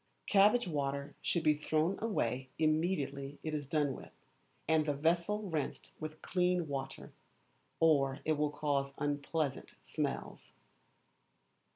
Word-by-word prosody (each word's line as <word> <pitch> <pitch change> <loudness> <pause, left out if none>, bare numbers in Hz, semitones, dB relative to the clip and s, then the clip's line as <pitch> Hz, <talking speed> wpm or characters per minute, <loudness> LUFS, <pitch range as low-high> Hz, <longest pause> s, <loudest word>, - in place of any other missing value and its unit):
Cabbage 210 +3 +5
Water 140 -3 -2
should 170 - 0
be 155 -1 +5
thrown 155 +4 0
away 130 - -1
immediately 155 -3 0
it 155 - -3
is 145 -2 -3
done 145 -2 +1
with, - - -10 0.6
and 160 -1 +3
the 145 - +1
vessel 170 +8 +1
rinsed 160 -7 -3
with 155 0 -7
clean 180 -2 +1
water, 135 -2 -5 0.7
or 140 -4 +4
it 155 - +3
will 150 0 +1
cause 145 -2 -1
unpleasant 145 0 -2
smells. 150 -3 -4
155 Hz, 120 wpm, -34 LUFS, 140-165 Hz, 0.7 s, Cabbage